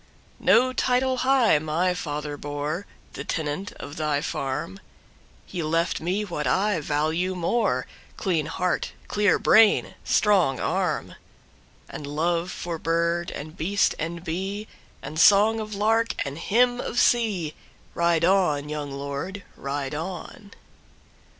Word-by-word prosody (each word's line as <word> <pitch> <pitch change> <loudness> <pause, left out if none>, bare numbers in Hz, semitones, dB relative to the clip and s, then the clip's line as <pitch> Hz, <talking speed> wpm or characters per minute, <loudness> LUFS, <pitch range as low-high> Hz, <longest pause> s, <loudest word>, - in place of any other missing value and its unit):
No 255 +1 +4
title 255 +1 +1
high 255 - +4
my 160 +4 0
father 150 -3 -4
bore; 145 +6 -4 0.3
The - - -6
tenant 160 +5 -3
of 145 +2 -9
thy 150 -2 0
farm, 130 -11 -3 0.7
He 175 - -5
left 165 +2 0
me 190 +6 -1
what 160 -6 -3
I 200 -1 +2
value 155 +5 0
more:Clean 170 - -1
heart, 180 +3 -1
clear 205 -3 +3
brain, 220 -1 +5
strong 185 -11 +3
armAnd - - -1 0.9
love 170 +4 0
for 170 -2 -5
bird 170 +1 0
and 155 +2 -7
beast 190 +5 +1
and 165 +2 -4
beeAnd 190 -4 -6
song 210 +6 +6
of 215 -1 -5
lark 225 +2 +2
and 140 +3 -5
hymn 245 +5 +2
of 240 - -2
sea, 205 -10 +2 0.4
Ride 170 -1 +2
on, 170 -6 +2
young 150 -1 -4
lord, 140 +8 -5
ride 140 0 -4
on! 180 +5 -6
170 Hz, 120 wpm, -25 LUFS, 150-205 Hz, 0.9 s, song